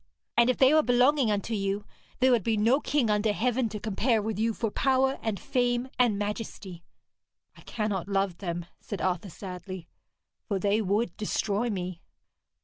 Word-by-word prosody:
And 235 +1 +5
if 255 - +2
they 265 +2 +6
were 310 - +6
belonging 250 0 +3
unto 210 +2 -1
you, 200 0 -1 0.4
there 260 0 +5
would 240 -3 +4
be 220 +3 0
no 230 +7 +4
king 280 -7 +1
under 210 +1 +2
heaven 245 +2 0
to 210 0 -5
compare 220 +3 +1
with 215 -1 -3
you 225 +1 +2
for 225 -1 -2
power 265 +2 +2
and 215 -4 -2
fame 245 +1 0
and 235 -5 +3
majesty.' 205 -4 -5 0.7
'I - - -16
cannot 210 -5 -3
love 195 -3 0
them,' 175 -3 -4
said 205 - -6
Arthur 185 +1 -1
sadly, 185 0 -8 0.6
'for 200 - 0
they 205 +3 +1
would 210 +4 0
destroy 215 +1 -1
me.' 180 -4 -4
215 Hz, 170 wpm, -28 LUFS, 195-245 Hz, 0.7 s, they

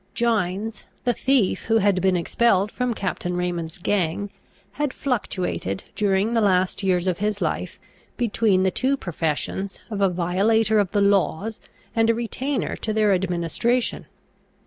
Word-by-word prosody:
Gines, 220 -2 -1 0.2
the 245 - +2
thief 255 -5 +1
who 225 0 +3
had 200 -3 +2
been 190 -1 +3
expelled 200 +3 +2
from 250 -2 -1
Captain 180 -2 -3
Raymond's 175 -1 -3
gang, 195 +1 -1 0.4
had 295 -3 -2
fluctuated, 185 - -2
during 205 +2 +1
the 230 - +3
last 185 -2 +2
years 185 -2 +1
of 180 -2 0
his 210 0 -1
life, - - -2 0.4
between 215 -5 +2
the 190 - +2
two 265 +8 +1
professions 175 - -3
of 205 -2 -2
a 195 - +4
violator 200 +5 +2
of 200 -3 +1
the 205 +1 +1
laws 200 +1 +1 0.4
and 225 0 +3
a 230 - +4
retainer 255 +4 -2
to 215 - -3
their 210 -2 +3
administration. 185 +7 0
200 Hz, 145 wpm, -23 LUFS, 185-225 Hz, 0.4 s, a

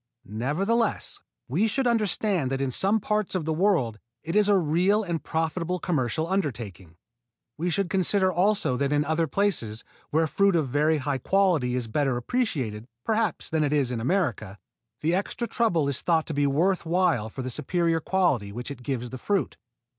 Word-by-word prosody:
Nevertheless 185 - -1 0.3
we 180 - +1
should 265 +5 -1
understand 210 - +1
that 135 0 -2
in 135 -1 -1
some 200 - +2
parts 210 -1 -1
of 175 -5 -1
the 160 - 0
world 155 - +1 0.2
it 165 +3 -4
is 210 -1 +4
a 200 - +5
real 180 +6 +2
and 170 -4 -3
profitable 165 +2 -1
commercial 160 -4 -1
undertaking. 115 - -3 0.6
We 170 +6 -2
should 195 +2 0
consider 190 +1 +2
also 190 -7 +1
that 140 +1 0
in 145 0 +2
other 160 +1 +1
places, 135 - -1 0.3
where 160 +2 +2
fruit 200 +4 +2
of 155 -4 +1
very 150 +4 +2
high 140 -1 -2
quality 170 -7 +2
is 125 -2 -2
better 135 +2 0
appreciated, 125 - -2 0.2
perhaps, 220 -4 0
than 160 -1 +2
it 145 0 0
is 140 -4 +1
in 115 -2 -3
America, 120 - -1 0.4
the 160 +3 +1
extra 200 +6 -1
trouble 195 - +1
is 140 -2 0
thought 165 -2 +2
to 160 - -5
be 145 0 +2
worth 175 +7 +1
while 165 -10 +1
for 130 +4 -6
the 130 - -4
superior 165 +4 0
quality 175 - +1
which 120 +6 -6
it 140 - -8
gives 125 -2 -3
the 130 - -7
fruit. 200 +4 -1
160 Hz, 180 wpm, -26 LUFS, 130-195 Hz, 0.6 s, a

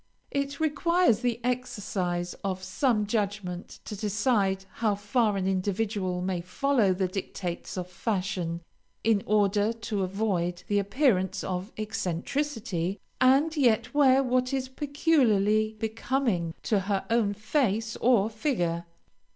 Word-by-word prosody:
It 280 0 -2
requires 320 - +3
the 240 -2 -1
exercise 195 -8 -2
of 190 -1 -2
some 210 +3 +1
judgment 200 -4 -3
to 210 - -5
decide 205 -2 +1 0.2
how 215 -3 +3
far 205 +1 +1
an 190 -1 -1
individual 190 -1 -1
may 185 -2 -1
follow 220 +3 +2
the 185 0 0
dictates 180 -1 -5
of 180 -1 -3
fashion, 180 -3 -2 0.4
in 220 -2 +3
order 205 0 +3
to 225 -3 -3
avoid 185 -2 -1
the 205 0 +2
appearance 200 - +1
of 185 +4 -3
eccentricity, 210 - -2 0.2
and 275 +5 +4
yet 245 -3 +2
wear 275 -2 +5
what 255 +1 +1
is 260 -1 -2
peculiarly 230 -8 +2
becoming 220 -6 -1
to 210 - +2
her 195 0 -1
own 220 -3 +2
face 220 -1 0
or 230 -5 +4
figure. 195 - -1
210 Hz, 125 wpm, -28 LUFS, 190-250 Hz, 0.4 s, wear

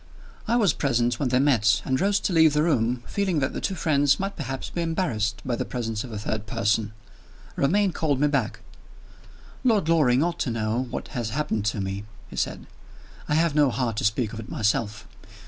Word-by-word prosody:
I 230 - +2
was 205 -10 +3
present 120 -3 0
when 135 - 0
they 125 - +2
met, 125 -4 +3
and 130 0 0
rose 200 +1 +2
to 185 - -1
leave 160 -2 +5
the 150 0 +2
room, 125 -6 +1
feeling 195 -4 -1
that 135 -2 0
the - - -4
two 195 - -1
friends 145 -5 +2
might 195 +1 -3
perhaps 135 -4 -5
be 170 - -2
embarrassed 135 - -1
by 125 -2 0
the - - -2
presence 115 -3 -3
of 125 - -9
a 110 - -4
third 105 +1 -3
person. 105 +1 0 0.6
Romayne 195 +7 +2
called 150 -5 0
me 150 - +4
back. 135 -5 -1 1.0
"Lord 220 -10 +3
Loring 145 -5 +4
ought 170 0 -2
to - - 0
know 115 +2 -1
what - - -5
has 120 -5 -3
happened 110 -5 -1
to 110 -1 0
me," 95 +1 -4 0.3
he - - -8
said. - - -2 0.6
"I 150 - +2
have 165 -1 +2
no 145 -2 +4
heart 120 -1 -1
to - - -1
speak 110 +1 0
of 115 - -6
it 115 - -8
myself. 105 -1 -1
130 Hz, 205 wpm, -25 LUFS, 110-160 Hz, 1.0 s, leave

